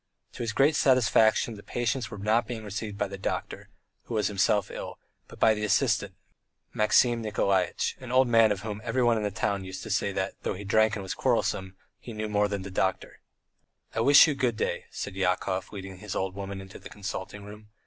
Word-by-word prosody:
To -, -, -8 dB
his 115 Hz, -2 st, -1 dB
great 140 Hz, +7 st, +3 dB
satisfaction 120 Hz, -4 st, +3 dB
the 105 Hz, -, -10 dB
patients 120 Hz, +1 st, -2 dB
were 105 Hz, -, -8 dB
not 110 Hz, +4 st, +1 dB
being 115 Hz, -3 st, -5 dB
received 105 Hz, 0 st, -5 dB
by 105 Hz, -, 0 dB
the 100 Hz, 0 st, -8 dB
doctor, -, -, -4 dB, 0.4 s
who 120 Hz, -, -5 dB
was 105 Hz, -, +1 dB
himself 100 Hz, 0 st, +1 dB
ill, -, -, -7 dB, 0.3 s
but -, -, -14 dB
by 110 Hz, -, +5 dB
the 105 Hz, 0 st, -4 dB
assistant, 105 Hz, -, +1 dB, 0.6 s
Maxim 115 Hz, +2 st, +3 dB
Nikolaitch, 100 Hz, -4 st, 0 dB
an 130 Hz, -2 st, -8 dB
old 130 Hz, 0 st, +4 dB
man 115 Hz, -2 st, +5 dB
of 100 Hz, -2 st, -2 dB
whom 105 Hz, -1 st, -5 dB
everyone 120 Hz, 0 st, +2 dB
in -, -, -1 dB
the 105 Hz, -, 0 dB
town 100 Hz, 0 st, -2 dB
used 95 Hz, 0 st, -7 dB
to 110 Hz, -, -6 dB
say 100 Hz, -1 st, +1 dB
that, 95 Hz, 0 st, -2 dB
though -, -, -2 dB
he 100 Hz, -, -8 dB
drank 110 Hz, +2 st, +3 dB
and 100 Hz, -, -5 dB
was 95 Hz, -, -4 dB
quarrelsome, 95 Hz, 0 st, 0 dB, 0.2 s
he 120 Hz, -, -9 dB
knew 110 Hz, 0 st, -3 dB
more 105 Hz, 0 st, +2 dB
than 100 Hz, -2 st, -4 dB
the 100 Hz, -, -8 dB
doctor. 95 Hz, 0 st, -2 dB, 0.7 s
"I -, -, -2 dB
wish 140 Hz, +5 st, +8 dB
you 150 Hz, -, +1 dB
good 125 Hz, -5 st, -1 dB
day," -, -, -2 dB
said 100 Hz, -, -6 dB
Yakov, 95 Hz, 0 st, -1 dB
leading 95 Hz, -2 st, -8 dB
his 105 Hz, -1 st, -6 dB
old 95 Hz, -1 st, -2 dB
woman 100 Hz, 0 st, -6 dB
into 95 Hz, -1 st, -11 dB
the -, -, -11 dB
consulting 100 Hz, 0 st, -6 dB
room. 105 Hz, +1 st, -12 dB
105 Hz, 210 wpm, -27 LUFS, 95-115 Hz, 0.7 s, wish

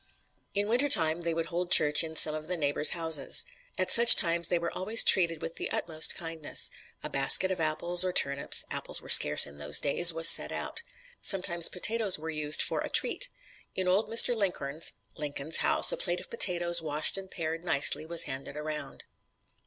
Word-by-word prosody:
"In 205 Hz, +1 st, -4 dB
winter 250 Hz, +6 st, -2 dB
time 165 Hz, -, +1 dB
they 170 Hz, -1 st, -4 dB
would 165 Hz, 0 st, -6 dB
hold 175 Hz, +1 st, -7 dB
church 150 Hz, -1 st, +3 dB
in 160 Hz, -1 st, -11 dB
some 155 Hz, 0 st, +6 dB
of 155 Hz, 0 st, -9 dB
the 180 Hz, +1 st, -5 dB
neighbors' 145 Hz, -1 st, +2 dB
houses. 160 Hz, -3 st, +1 dB, 0.3 s
At 185 Hz, 0 st, -3 dB
such 235 Hz, 0 st, +9 dB
times 170 Hz, -1 st, -1 dB
they 175 Hz, -, -3 dB
were 170 Hz, 0 st, -8 dB
always 215 Hz, +5 st, +2 dB
treated 170 Hz, -4 st, +2 dB
with 165 Hz, -, -10 dB
the -, -, -7 dB
utmost 160 Hz, -1 st, -1 dB
kindness; 165 Hz, -3 st, -4 dB, 0.3 s
a -, -, -8 dB
basket 190 Hz, -, 0 dB
of 185 Hz, -, -7 dB
apples, 170 Hz, +3 st, +1 dB
or 185 Hz, -, -4 dB
turnips 140 Hz, -5 st, +2 dB
apples -, -, -2 dB
were -, -, -17 dB
scarce 75 Hz, -, +7 dB
in 70 Hz, 0 st, -15 dB
those 75 Hz, +1 st, 0 dB
days 170 Hz, +4 st, +2 dB
was 165 Hz, 0 st, +1 dB
set -, -, +5 dB
out. -, -, -8 dB, 0.4 s
Sometimes 175 Hz, -3 st, +1 dB
potatoes 210 Hz, +1 st, -2 dB
were 160 Hz, +1 st, -10 dB
used 150 Hz, 0 st, +1 dB
for -, -, -4 dB
a -, -, -8 dB
'treat.' -, -, +1 dB, 0.5 s
In 185 Hz, -1 st, -6 dB
old 195 Hz, +4 st, -2 dB
Mr. 230 Hz, +2 st, 0 dB
Linkhorn's 165 Hz, -7 st, -6 dB, 0.2 s
(Lincoln's) 150 Hz, 0 st, -3 dB
house -, -, +2 dB
a -, -, -7 dB
plate -, -, -4 dB
of -, -, -13 dB
potatoes, 175 Hz, -, 0 dB
washed 150 Hz, -1 st, -4 dB
and 195 Hz, -1 st, -10 dB
pared 165 Hz, -1 st, -9 dB
nicely, 155 Hz, -3 st, 0 dB
was 165 Hz, +1 st, -3 dB
handed 135 Hz, +1 st, -9 dB
around." 150 Hz, 0 st, -9 dB
165 Hz, 190 wpm, -25 LUFS, 155-185 Hz, 0.5 s, such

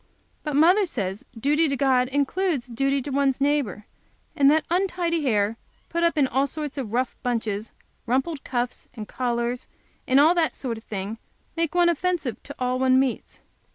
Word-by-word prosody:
But 300 Hz, -2 st, -3 dB
mother 360 Hz, +7 st, +5 dB
says 200 Hz, -, -4 dB
duty 295 Hz, +5 st, +2 dB
to 275 Hz, -, -1 dB
God 255 Hz, -2 st, +3 dB
includes 285 Hz, +2 st, 0 dB
duty 275 Hz, +2 st, 0 dB
to 285 Hz, -, -5 dB
one's 275 Hz, -1 st, +1 dB
neighbor, 275 Hz, -8 st, 0 dB, 0.5 s
and 275 Hz, -1 st, +5 dB
that 310 Hz, +2 st, +3 dB
untidy 350 Hz, -2 st, +1 dB
hair, 220 Hz, -5 st, +1 dB, 0.3 s
put 340 Hz, -, -1 dB
up 335 Hz, -1 st, +2 dB
in 285 Hz, -, +5 dB
all 265 Hz, +2 st, +1 dB
sorts 295 Hz, 0 st, -5 dB
of 235 Hz, -6 st, -4 dB
rough 250 Hz, +2 st, 0 dB
bunches, 225 Hz, -3 st, -2 dB, 0.4 s
rumpled 270 Hz, +5 st, 0 dB
cuffs 245 Hz, -1 st, -3 dB
and 215 Hz, -3 st, -7 dB
collars, 240 Hz, -1 st, -2 dB, 0.4 s
and 260 Hz, +2 st, +5 dB
all 310 Hz, +4 st, +6 dB
that 335 Hz, -3 st, +1 dB
sort 235 Hz, -4 st, -4 dB
of -, -, -21 dB
thing, 205 Hz, +2 st, -5 dB, 0.4 s
make 330 Hz, -1 st, -1 dB
one 350 Hz, -1 st, +5 dB
offensive 340 Hz, -, -1 dB
to 285 Hz, -, -10 dB
all 250 Hz, 0 st, -1 dB
one 260 Hz, 0 st, +4 dB
meets. 265 Hz, -3 st, -2 dB
270 Hz, 175 wpm, -24 LUFS, 240-310 Hz, 0.5 s, all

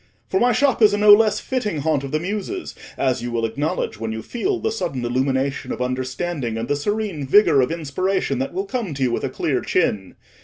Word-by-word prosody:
"For 190 Hz, -, +1 dB
my 245 Hz, +1 st, +4 dB
shop 255 Hz, +1 st, +2 dB
is 210 Hz, -1 st, +6 dB
a -, -, -1 dB
no 210 Hz, 0 st, +8 dB
less 210 Hz, 0 st, +4 dB
fitting 215 Hz, -, -2 dB
haunt 150 Hz, -2 st, 0 dB
of 135 Hz, -, -6 dB
the 155 Hz, -, 0 dB
Muses, 210 Hz, -, -4 dB, 0.2 s
as 130 Hz, -2 st, 0 dB
you 120 Hz, 0 st, -4 dB
will 115 Hz, -1 st, 0 dB
acknowledge 115 Hz, -1 st, -2 dB
when 115 Hz, 0 st, -3 dB
you 110 Hz, 0 st, -5 dB
feel 375 Hz, -, -2 dB
the 440 Hz, -, -1 dB
sudden 135 Hz, -, -3 dB
illumination 130 Hz, +2 st, -1 dB
of -, -, -4 dB
understanding 130 Hz, +1 st, -2 dB
and 115 Hz, +1 st, -3 dB
the 145 Hz, -, +1 dB
serene 195 Hz, -2 st, -2 dB
vigour 150 Hz, -4 st, +5 dB
of 125 Hz, -, 0 dB
inspiration 165 Hz, -1 st, -1 dB
that 135 Hz, -, -2 dB
will 190 Hz, +3 st, -3 dB
come 200 Hz, -, -3 dB
to 135 Hz, -, -1 dB
you 125 Hz, -, +2 dB
with -, -, -2 dB
a -, -, -1 dB
clear -, -, -1 dB
chin. 95 Hz, -3 st, -1 dB
150 Hz, 225 wpm, -21 LUFS, 130-210 Hz, 0.2 s, no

